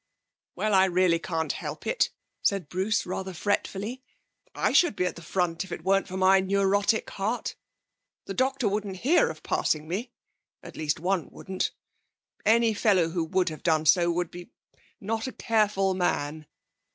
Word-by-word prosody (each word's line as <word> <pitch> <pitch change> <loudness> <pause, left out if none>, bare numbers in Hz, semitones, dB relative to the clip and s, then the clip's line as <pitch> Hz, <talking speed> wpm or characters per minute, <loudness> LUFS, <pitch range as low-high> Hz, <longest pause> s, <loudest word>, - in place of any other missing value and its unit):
'Well, 215 -1 0
I 190 0 +6
really 180 -2 +3
can't 165 -2 -2
help - - -6
it,' - - +1 0.3
said 195 -7 0
Bruce 190 +4 0
rather 185 0 -4
fretfully. 205 +6 -2 0.5
'I - - +1
should 345 - +4
be 180 - 0
at 180 - -2
the - - -10
front 170 0 -1
if 190 - -13
it 160 - -5
weren't 195 +2 +2
for 185 0 -5
my 190 +1 +5
neurotic 200 +3 +1
heart. 215 +5 -2 0.7
The 195 - -5
doctor 260 +2 +1
wouldn't 200 -1 -2
hear 335 +6 +4
of - - -9
passing 155 0 0
me 215 +9 -3 0.5
at - - -11
least 155 0 -1
one 180 -1 -1
wouldn't. 190 -1 -3 0.8
Any 230 0 +4
fellow 195 -6 +3
who 170 0 -1
would 180 +2 +1
have 155 - -8
done 160 -2 +2
so 170 +2 +5
would 175 0 -1
be 175 0 -10 0.5
not 225 +4 -2
a - - -4
careful 210 -5 +1
man. 155 -4 -1
190 Hz, 165 wpm, -27 LUFS, 175-210 Hz, 0.8 s, I